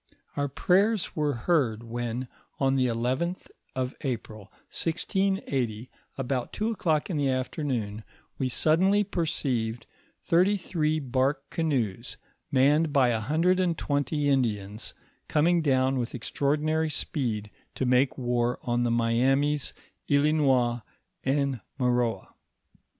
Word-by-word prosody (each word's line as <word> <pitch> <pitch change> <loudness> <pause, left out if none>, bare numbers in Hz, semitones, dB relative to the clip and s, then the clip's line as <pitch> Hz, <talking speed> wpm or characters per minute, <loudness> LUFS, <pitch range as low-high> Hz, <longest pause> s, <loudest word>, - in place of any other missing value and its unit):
Our 145 0 0
prayers 190 - +2
were 150 -2 +1
heard 120 -5 +1
when, 120 +1 -4 0.3
on 135 -1 +2
the 130 -1 +2
11th 130 +10 -2 0.2
of 130 0 -2
April, 110 -6 -4 0.3
1680, 160 - -1 0.3
about 130 -2 -2
two 215 +2 -1
o'clock 165 -5 0
in 165 - -1
the 140 -2 +1
afternoon, 130 -5 -2 0.4
we 130 -2 0
suddenly 185 +10 +3
perceived 125 - -2 0.4
thirty 185 +4 +3
three 155 -4 0
bark 135 +1 0
canoes, 125 - -1 0.3
manned 145 +4 +4
by 135 -4 +4
a 115 -2 +1
hundred 165 - +2
and 175 -3 +1
twenty 145 +1 0
Indians, 110 -6 -1 0.3
coming 170 +3 +3
down 130 -2 +2
with 120 0 -3
extraordinary 155 +5 0
speed, 115 - -2 0.2
to 130 - -1
make 125 +1 +3
war 120 -1 0
on 120 0 0
the 120 - +1
Miamis, 130 +5 +2 0.4
Islinois, 140 -5 +3 0.4
and 135 -3 0 0.2
Maroa. 120 -5 0
135 Hz, 115 wpm, -27 LUFS, 120-155 Hz, 0.4 s, manned